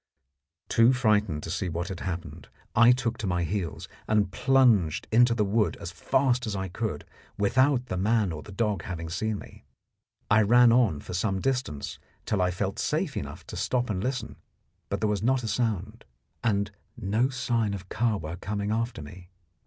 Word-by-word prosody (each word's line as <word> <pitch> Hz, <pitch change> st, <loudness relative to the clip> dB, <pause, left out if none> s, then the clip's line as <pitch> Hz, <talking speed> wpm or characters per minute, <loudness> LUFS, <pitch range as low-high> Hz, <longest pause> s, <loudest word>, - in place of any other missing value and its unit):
Too 115 Hz, +3 st, +5 dB
frightened 105 Hz, -10 st, +1 dB
to 80 Hz, -, -5 dB
see 90 Hz, +1 st, -2 dB
what 85 Hz, +3 st, -3 dB
happened, 85 Hz, -3 st, -5 dB, 0.3 s
I 120 Hz, +1 st, +7 dB
took 120 Hz, -2 st, 0 dB
to 105 Hz, -, -3 dB
my 90 Hz, -1 st, 0 dB
heels, 85 Hz, -1 st, -3 dB, 0.2 s
and 105 Hz, -3 st, +2 dB
plunged 120 Hz, -, +3 dB
into 120 Hz, +1 st, +5 dB
the 105 Hz, -3 st, +1 dB
wood 105 Hz, +2 st, +1 dB
as 85 Hz, -, -6 dB
fast 125 Hz, +7 st, +1 dB
as 105 Hz, -, -2 dB
I 95 Hz, -1 st, -3 dB
could, 100 Hz, -4 st, -4 dB, 0.3 s
without 130 Hz, +5 st, +3 dB
the 95 Hz, -, -4 dB
man 105 Hz, 0 st, +2 dB
or 75 Hz, -1 st, -5 dB
the 105 Hz, -, -11 dB
dog 105 Hz, -3 st, -1 dB
having 85 Hz, -3 st, -5 dB
seen 110 Hz, +4 st, -1 dB
me. -, -, -12 dB, 0.6 s
I 105 Hz, +1 st, +5 dB
ran 120 Hz, +3 st, +6 dB
on 115 Hz, -, +3 dB
for -, -, -8 dB
some 95 Hz, +1 st, 0 dB
distance 125 Hz, -, -2 dB, 0.3 s
till 100 Hz, -3 st, 0 dB
I 90 Hz, -, +3 dB
felt 95 Hz, +2 st, -3 dB
safe 155 Hz, 0 st, -1 dB
enough 70 Hz, -, -6 dB
to -, -, -8 dB
stop 125 Hz, -3 st, 0 dB
and 95 Hz, -1 st, -2 dB
listen, 130 Hz, -2 st, -3 dB, 0.5 s
but -, -, -2 dB
there 110 Hz, -, +2 dB
was 105 Hz, -2 st, 0 dB
not 125 Hz, +2 st, +2 dB
a -, -, -3 dB
sound, 110 Hz, -1 st, -2 dB, 0.4 s
and 100 Hz, -2 st, +1 dB, 0.3 s
no 115 Hz, +4 st, +1 dB
sign 120 Hz, -5 st, 0 dB
of 95 Hz, -2 st, -9 dB
Kahwa 95 Hz, -8 st, -1 dB
coming 100 Hz, +1 st, -2 dB
after 115 Hz, -6 st, -2 dB
me. 90 Hz, +4 st, -12 dB
105 Hz, 180 wpm, -27 LUFS, 95-120 Hz, 0.6 s, I